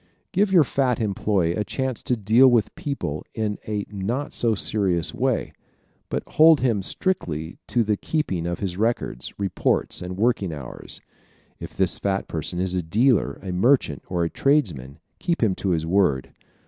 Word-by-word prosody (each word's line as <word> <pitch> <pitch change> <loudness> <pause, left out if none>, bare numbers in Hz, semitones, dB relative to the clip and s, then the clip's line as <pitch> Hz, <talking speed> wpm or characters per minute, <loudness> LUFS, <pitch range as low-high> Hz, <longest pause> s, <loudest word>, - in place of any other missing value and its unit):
Give 200 0 +2
your 175 -5 +7
fat 130 -3 0
employee 100 -5 0
a 105 - -1
chance 130 +4 -3
to 125 - 0
deal 110 +5 +5
with 120 -4 +3
people 75 - -4
in 105 -2 -2
a 105 -2 -2
not 115 +9 -3
too 115 -2 +1
serious 95 -6 -1
way, - - -1 0.6
but - - -2
hold 160 -1 +5
him 115 -6 +1
strictly 85 - -2
to 120 - +2
the 105 -1 0
keeping 95 - -2
of 85 - -2
his 95 -3 -3
records, 110 - -1
reports 100 -1 -1
and 90 +1 -5
working 110 -4 +1
hours. 70 -5 -8 0.6
If - - -9
this - - +1
fat 100 -1 -1
person 80 +2 -4
is 95 0 -1
a 90 - 0
dealer, 105 - +2
a 95 - -4
merchant 95 - +2
or 90 -2 -1
a 85 - 0
tradesman 85 - 0 0.2
keep 170 -7 0
him 105 -4 +3
to 100 - -2
his 80 -3 0
word. 85 -7 +1
100 Hz, 170 wpm, -24 LUFS, 90-125 Hz, 0.6 s, your